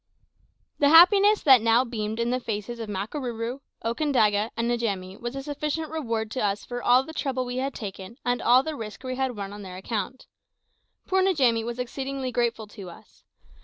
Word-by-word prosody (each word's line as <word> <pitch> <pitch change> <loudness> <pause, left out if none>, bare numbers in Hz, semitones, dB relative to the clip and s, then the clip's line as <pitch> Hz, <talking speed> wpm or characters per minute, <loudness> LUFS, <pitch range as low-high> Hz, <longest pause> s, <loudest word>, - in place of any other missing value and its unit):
The 285 - +5
happiness 395 +6 +7
that 265 -5 +7
now 230 +3 +4
beamed 220 -2 -4
in 235 +1 0
the 255 - 0
faces 230 0 -5
of 225 -2 -5
Makarooroo, 230 +4 -4 0.3
Okandaga, 230 -5 +2
and 235 +1 0
Njamie 200 -5 -2
was 240 +2 -5
a 270 - -5
sufficient 300 +2 -3
reward 230 -8 -2
to 255 - -2
us 205 0 -1
for 245 0 -5
all 250 +2 +5
the 320 - -10
trouble 265 -4 -2
we 245 0 -4
had 270 +1 -2
taken 195 +1 -7
and 245 0 0
all 250 +2 +5
the 315 +1 -4
risk 220 -1 -8
we 255 0 -3
had 260 -3 -2
run 200 0 -5
on 205 - -8
their 185 -2 -8
account. 215 +5 -4 0.8
Poor 380 0 +2
Njamie 265 -12 +3
was 235 +1 -5
exceedingly 265 +1 -4
grateful 235 -2 -1
to 200 -3 -10
us. 170 - -16
240 Hz, 190 wpm, -26 LUFS, 220-270 Hz, 0.8 s, happiness